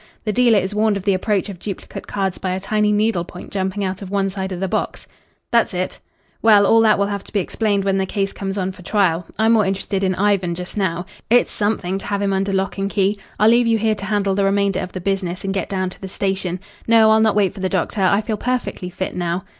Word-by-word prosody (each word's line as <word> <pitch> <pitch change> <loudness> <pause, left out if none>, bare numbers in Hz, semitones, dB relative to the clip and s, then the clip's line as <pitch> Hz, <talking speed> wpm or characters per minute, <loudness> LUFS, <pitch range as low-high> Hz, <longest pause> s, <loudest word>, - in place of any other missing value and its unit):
The 215 - 0
dealer 240 -2 +4
is 190 +1 -1
warned 210 -1 +2
of 195 - -6
the 200 -1 +2
approach 195 +1 0
of 195 -4 -8
duplicate 200 -1 -7
cards 195 -2 -2
by 185 -1 -2
a 185 - -2
tiny 210 +2 +1
needle 210 -3 +1
point 180 +1 -11
jumping 190 +1 -2
out 190 0 -3
of 195 - -7
one 195 -1 0
side 190 0 -4
of 180 - -4
the 190 - -1
box." - - -3 0.5
"That's 235 -5 +2
it." 185 +1 -3 0.4
"Well, 210 -2 +6
all 225 +3 +5
that 220 -1 +4
will 200 - +2
have 200 -1 -3
to - - -13
be 210 - +1
explained 205 +1 0
when 195 -1 +1
the 190 - -1
case 195 0 -2
comes 195 0 -4
on 190 -1 -1
for 185 - -14
trial. 180 -3 +1
I'm 220 +1 +3
more 220 -2 +4
interested 195 0 -2
in 185 -1 +1
Ivan 190 -3 +1
just 180 +1 -7
now. 180 -3 -1 0.2
It's 245 +2 +4
something 195 -3 -1
to - - -8
have 200 0 -1
him 195 -1 +1
under 195 +1 0
lock 195 0 -1
and 195 0 -1
key. 200 0 +1 0.2
I'll 215 +2 +6
leave 240 0 +4
you 225 -1 +3
here 220 0 +1
to 200 -2 -6
handle 205 -2 0
the 200 +1 +1
remainder 195 -1 +1
of 180 - -5
the 185 - -5
business 185 -1 -2
and 195 0 -2
get 195 - -2
down 185 -2 -1
to - - -13
the 190 - -5
station. 190 -2 -2 0.3
No 225 -1 +6
I'll 220 0 +5
not 220 -2 +3
wait 200 -4 +2
for - - -10
the 190 0 -1
doctor. 190 +2 -1
I 200 +2 +3
feel 215 0 -3
perfectly 245 -6 -2
fit 185 +1 -4
now." 175 +2 -2
195 Hz, 260 wpm, -20 LUFS, 190-210 Hz, 0.5 s, Well